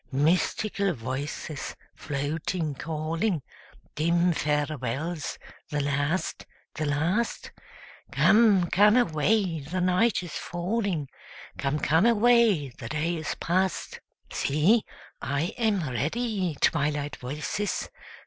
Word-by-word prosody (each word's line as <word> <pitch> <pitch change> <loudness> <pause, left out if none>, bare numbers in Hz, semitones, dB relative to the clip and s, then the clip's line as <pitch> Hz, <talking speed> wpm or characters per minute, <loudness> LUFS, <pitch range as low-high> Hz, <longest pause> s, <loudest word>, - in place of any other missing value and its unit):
Mystical 180 +7 +1
voices, 135 +4 -5 0.2
floating, 150 +3 -3
calling; 160 +4 -2 0.5
Dim 170 +3 +2
farewells 150 +1 -2 0.3
the 145 - -1
last, 145 +5 -1 0.3
the 155 -2 -2
last? 170 +11 0 0.6
Come, 210 -4 +5
come 210 +4 +6
away, 185 -3 +2
the 155 +6 -4
night 185 +3 +2
is 175 - -8
falling; 180 -3 -2 0.5
'Come, 140 +1 0
come 160 +8 +3
away, 230 - +4
the 120 -1 -9
day 155 +3 -1
is 160 -2 -3
past.' 185 +2 -1 0.3
See, 170 +11 +3 0.4
I 145 +5 -1
am 205 -8 +1
ready, 180 - -1
Twilight 145 -2 +1
voices! 150 +10 -3
165 Hz, 100 wpm, -27 LUFS, 145-195 Hz, 0.6 s, come